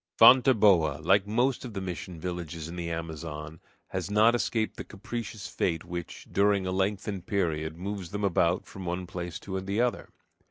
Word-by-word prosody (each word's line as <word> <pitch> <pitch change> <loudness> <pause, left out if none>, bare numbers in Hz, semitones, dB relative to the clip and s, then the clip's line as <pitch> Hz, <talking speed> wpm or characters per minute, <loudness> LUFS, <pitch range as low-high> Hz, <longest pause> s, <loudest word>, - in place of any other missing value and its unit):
Fonteboa, 105 - +6
like 100 0 +4
most 120 +4 +1
of 120 -4 -7
the - - -1
mission 90 -2 -5
villages 85 -2 -5
of 85 - -7
the 85 -1 -3
Amazon, 80 -1 -5 0.3
has - - -3
not 110 +3 +5
escaped 115 -2 0
the - - -5
capricious 110 0 -6
fate 85 -5 -1
which, 85 0 -6
during 100 -1 +3
a 95 - -1
lengthened 95 0 -1
period, 80 -5 -1
moves 95 -1 -5
them 105 +2 -4
about 90 -2 +2
from 95 - -9
one 90 +1 -3
place 90 -2 -5
to 95 -1 -4
the 100 +3 -2
other. 125 0 0
95 Hz, 170 wpm, -28 LUFS, 85-105 Hz, 0.3 s, Fonteboa